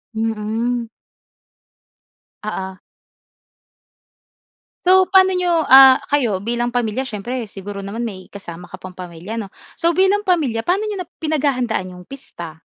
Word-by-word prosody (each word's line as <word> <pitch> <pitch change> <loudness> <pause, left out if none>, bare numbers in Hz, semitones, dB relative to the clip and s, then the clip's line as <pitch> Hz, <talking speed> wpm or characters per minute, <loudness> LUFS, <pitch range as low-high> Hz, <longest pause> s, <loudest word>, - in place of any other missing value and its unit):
Mm. 225 +2 -2 1.6
Oo. 190 -3 -5 2.1
So, 375 +1 +5
paano 380 -1 +5
niyo 350 -3 +1
ah, 265 0 +9
kayo 240 -10 +1
bilang 240 +4 -2
pamilya 240 +1 -1
siyempre 240 +1 -4
siguro 200 0 -7
naman 225 +4 -4
may 185 -4 -10
kasama 180 -3 -9
ka 185 - -9
pang 185 -1 -10
pamilya, 180 +3 -8
'no? 210 -4 -5 0.2
So, 335 0 +2
bilang 385 +4 +2
pamilya 300 - +1
paano 390 +5 0
nyo 400 -3 -3
na - - -25
pinaghahandaan 260 - -1
yung 180 0 -13
pista? 170 - -10
235 Hz, 125 wpm, -19 LUFS, 200-310 Hz, 2.1 s, ah